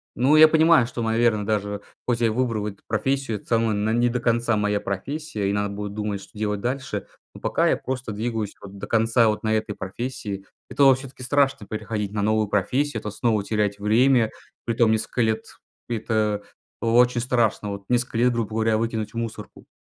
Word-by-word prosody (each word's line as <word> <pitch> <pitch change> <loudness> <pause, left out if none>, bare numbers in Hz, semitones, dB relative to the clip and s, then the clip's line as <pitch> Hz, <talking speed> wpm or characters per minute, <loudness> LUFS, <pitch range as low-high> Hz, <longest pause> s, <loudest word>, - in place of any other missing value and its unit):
Но 135 +5 +4
я 155 0 +9
понимаю, 160 -5 +5
что 120 -2 -4
наверное 110 -2 +2
даже 105 -1 -1 0.3
хоть 120 -1 0
я 115 - +4
и - - +2
выбрал 110 -2 -1
эту 100 -1 -8
профессию, 115 +1 -1
это - - -16
самое, 115 -1 +2
она 105 +1 0
не 120 +1 +3
до 125 - -1
конца 115 -1 +1
моя 105 0 0
профессия, 105 +1 -3
и - - 0
надо 105 0 0
будет 105 0 -5
думать, 105 -1 -3
что - - -15
делать 105 -1 -1
дальше. 125 -3 -3 0.3
Но - - -9
пока - - +1
я - - +2
просто 130 -3 -4
двигаюсь 110 -1 -3
вот 100 0 -11
до - - -6
конца 115 +1 +3
вот 105 +1 -1
на 110 0 +1
этой 110 -1 -1
профессии, 100 -1 -5 0.2
это 135 +1 +5
все-таки 130 -1 -10
страшно 135 -5 +1
переходить 105 -1 -3
на 105 -1 -2
новую 110 0 +2
профессию, 115 +6 0
это 105 -1 -5
снова 110 -2 0
терять 105 -1 0
время, 115 +2 +3 0.3
притом 115 -1 +2
несколько 110 +2 0
лет, 110 0 0 0.4
это 110 -2 0 0.4
о 115 0 +1
очень 125 -1 +4
страшно, 115 -4 +1
вот 100 0 -6
несколько 125 -1 0
лет 125 +2 +4
грубо 115 -2 -2
говоря 110 0 +2
выкинуть 110 -2 -2
в - - -7
мусорку. 115 -1 -6
110 Hz, 195 wpm, -24 LUFS, 105-120 Hz, 0.4 s, я